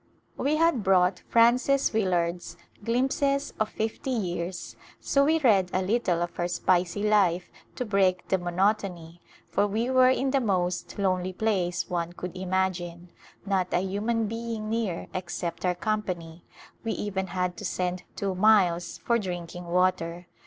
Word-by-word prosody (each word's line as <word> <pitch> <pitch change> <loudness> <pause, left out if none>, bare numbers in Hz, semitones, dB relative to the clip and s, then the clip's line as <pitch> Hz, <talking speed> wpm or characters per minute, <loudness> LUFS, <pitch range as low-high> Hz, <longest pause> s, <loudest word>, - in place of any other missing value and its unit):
We 290 +3 0
had 330 -6 +3
brought 180 -2 +3
Frances 250 +4 +4
Willard's 175 -4 0
" - - -27
Glimpses 270 +4 0
of 215 0 +1
Fifty 220 +5 -3
Years," 180 -6 -3 0.2
so 280 - +2
we 315 +3 +3
read 205 - +3
a 185 - +1
little 185 -4 +1
of 175 - -5
her 175 - 0
spicy 180 +2 +1
life 185 -4 +2 0.2
to 250 - -3
break 190 -4 +1
the 190 - +1
mo 175 0 -4
notony, 180 -3 -1 0.3
for 205 - +2
we 225 +5 -1
were 255 0 +6
in 265 +1 +1
the 275 - +3
most 180 -5 -1
lonely 185 -2 0
place 185 -4 0
one 175 -1 -2
could 180 0 -7
imagine; 180 -2 -2 0.3
not 190 -3 0
a 180 - +2
human 215 +4 -1
being 225 0 -4
near 220 -7 -1
except 175 -1 -4
our 180 0 +1
company; 180 -5 -3 0.4
we 225 - -1
even 190 -2 -3
had 180 0 -2
to - - -8
send 180 0 -2
two 195 -1 -2
miles 185 -4 +3
for 235 0 +1
drinking 175 -3 -5
water. 175 -1 0
190 Hz, 155 wpm, -27 LUFS, 175-220 Hz, 0.4 s, were